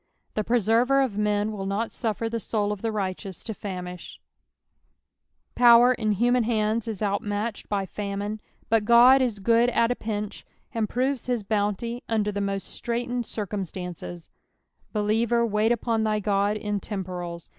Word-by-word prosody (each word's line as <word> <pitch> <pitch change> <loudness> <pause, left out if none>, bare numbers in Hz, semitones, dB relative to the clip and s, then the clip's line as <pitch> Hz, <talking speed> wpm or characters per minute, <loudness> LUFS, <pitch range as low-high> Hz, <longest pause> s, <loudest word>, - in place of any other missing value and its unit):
The 215 - -1
Preserver 240 +4 +3
of 245 -7 -2
men 210 0 +1
will 195 -2 -4
not 210 +4 -1
suffer 225 0 -2
the 230 0 -2
soul 210 -2 -1
of 205 -2 -4
the 225 - -1
righteous 195 -2 -4
to 220 - -4
famish, 180 -3 -7 1.4
^'ower 240 +1 +7
in 215 -4 0
human 245 +4 +3
hands 220 0 0
is 215 -2 -3
outmatched 205 +2 -2
hy 200 -2 0
famine, 205 +2 -4 0.3
but 225 -1 +3
God 240 +4 +7
is 240 -5 0
cood 230 +4 +3
at 230 0 +2
a - - +1
pinch, 210 -2 -4 0.3
and 220 -3 -1
proves 260 +1 -1
his 245 -4 0
bounty 210 +3 -1
under 215 -2 +1
the 205 0 -3
most 195 -1 -2
straitened 240 0 -2
cir 210 - -3
cumstnnc^) 180 - -6 0.6
Believer, 225 +3 +1
wait 215 +1 +1
upon 230 -1 0
thy 215 -1 +1
Ood 205 0 +1
in 210 -1 -2
temporals. 180 -4 -5
215 Hz, 155 wpm, -26 LUFS, 200-235 Hz, 1.4 s, ^'ower